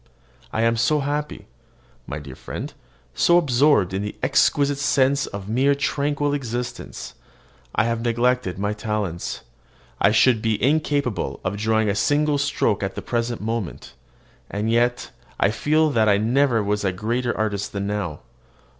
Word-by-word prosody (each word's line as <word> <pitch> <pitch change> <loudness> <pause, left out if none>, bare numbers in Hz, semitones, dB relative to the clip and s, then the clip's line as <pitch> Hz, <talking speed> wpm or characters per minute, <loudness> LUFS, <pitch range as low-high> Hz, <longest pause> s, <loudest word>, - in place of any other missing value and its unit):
I 110 - 0
am 115 0 +2
so 145 +6 +2
happy, 145 +1 -3 0.6
my 70 - -4
dear 70 -3 -9
friend, - - -7 0.4
so 175 - +4
absorbed 140 - +3
in 95 - -1
the 105 0 -5
exquisite 140 -1 +2
sense 140 0 +2
of 100 -1 -7
mere 135 +6 +2
tranquil 145 +1 0
existence, 125 -3 -5 0.6
that 110 - +4
I 115 -1 -1
neglect 120 -3 0
my 100 +2 -1
talents. 105 -5 -3 0.6
I 100 - +6
should 115 +1 +4
be 110 -1 0
incapable 140 - 0
of 95 +2 -2
drawing 110 +1 +1
a 100 - +2
single 145 +6 +1
stroke 140 -7 0
at 95 -1 -3
the - - -5
present 120 0 -2
moment; 110 -3 -4 0.6
and 105 +2 -2
yet 120 +1 +1 0.3
I 100 - +3
feel 155 +6 +2
that 110 -5 +3
I 100 - +4
never 120 +1 +2
was 105 0 -1
a 95 - +1
greater 120 +6 -2
artist 105 -2 -2
than 100 0 -3
now. 100 -7 -3
115 Hz, 155 wpm, -23 LUFS, 105-140 Hz, 0.6 s, I